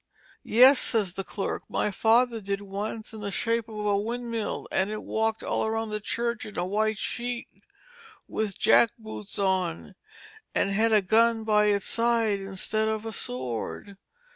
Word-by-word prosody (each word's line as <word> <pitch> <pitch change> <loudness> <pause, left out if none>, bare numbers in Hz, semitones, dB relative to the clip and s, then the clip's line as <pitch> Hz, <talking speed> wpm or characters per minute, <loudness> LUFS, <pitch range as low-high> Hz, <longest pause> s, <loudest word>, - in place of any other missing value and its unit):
Yes, 255 +4 +6
says 205 -6 0
the 195 - -4
clerk, 195 +1 -4
my 210 - 0
father 230 +3 +3
did 200 0 -2
once 205 +3 -5
in 220 - -8
the 200 - -3
shape 230 +2 -1
of 210 -1 -5
a 205 -1 +2
windmill, 230 +1 -3
and 190 +2 +1
it 215 0 -5
walked 220 0 -1
all 220 - 0
round 225 0 -2
the 210 - -2
church 235 +3 -2
in 210 -2 -9
a 175 - 0
white 215 +3 0
sheet, 240 +2 -4 0.8
with 215 -3 -3
jack 235 - +5
boots 215 -2 -7
on, 185 - -1 0.6
and 195 - +1
had 225 +3 +2
a 210 -2 +4
gun 225 +3 +3
by 210 -1 +3
its 200 -1 +1
side 230 -3 +2
instead 195 +3 -1
of 220 0 -2
a 225 - -4
sword. 125 - -4
215 Hz, 165 wpm, -27 LUFS, 200-225 Hz, 0.8 s, Yes